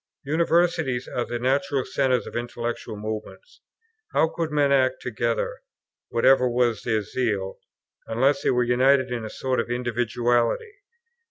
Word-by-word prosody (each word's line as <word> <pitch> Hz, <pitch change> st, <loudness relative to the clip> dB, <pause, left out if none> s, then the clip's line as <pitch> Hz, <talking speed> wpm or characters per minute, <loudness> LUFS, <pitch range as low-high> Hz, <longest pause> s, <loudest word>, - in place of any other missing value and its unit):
Universities 160 Hz, -4 st, +1 dB
are 120 Hz, -, -2 dB
the 120 Hz, -, -3 dB
natural 135 Hz, +3 st, 0 dB
centres 130 Hz, -3 st, +1 dB
of -, -, -9 dB
intellectual 120 Hz, -2 st, -4 dB
movements. 110 Hz, -, -7 dB, 0.5 s
How 160 Hz, -, +3 dB
could 165 Hz, -1 st, -3 dB
men 145 Hz, -2 st, +2 dB
act 130 Hz, -1 st, +3 dB
together, -, -, -2 dB, 0.5 s
whatever 125 Hz, +1 st, +4 dB
was 120 Hz, -3 st, +1 dB
their 110 Hz, -3 st, 0 dB
zeal, 100 Hz, -5 st, -2 dB, 0.5 s
unless 135 Hz, +5 st, +2 dB
they -, -, +1 dB
were 125 Hz, -1 st, +3 dB
united 130 Hz, +2 st, +3 dB
in 120 Hz, -2 st, -3 dB
a 110 Hz, -, -5 dB
sort 130 Hz, +2 st, -2 dB
of -, -, -2 dB
individuality? 120 Hz, -, 0 dB
125 Hz, 140 wpm, -24 LUFS, 120-140 Hz, 0.5 s, whatever